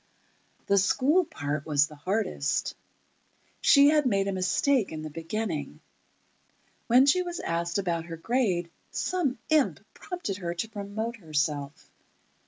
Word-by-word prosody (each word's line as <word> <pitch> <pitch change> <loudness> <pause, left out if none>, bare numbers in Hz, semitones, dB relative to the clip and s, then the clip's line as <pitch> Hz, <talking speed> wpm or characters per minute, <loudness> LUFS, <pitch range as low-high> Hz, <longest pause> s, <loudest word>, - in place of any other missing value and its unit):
The 200 0 +4
school 290 - +3
part 145 - -4
was 145 -2 +4
the 150 0 -12
hardest. 185 -3 -1 0.9
She 280 0 +7
had 300 -3 +3
made 195 -4 +1
a - - 0
mistake 195 +6 +1
in 155 -1 -6
the 155 - -6
beginning: 165 - -4 1.1
When 250 +3 +6
she 300 +6 +4
was 350 -1 -4
asked 170 +1 -1
about 170 -4 -1
her 165 -1 -7
grade, 185 -5 0 0.2
some 330 -8 -1
imp 310 -3 +3
prompted 355 - -5
her 175 -3 -4
to 195 +6 -3
promote 220 +2 -4
herself. 150 -5 -3
195 Hz, 135 wpm, -27 LUFS, 165-255 Hz, 1.1 s, She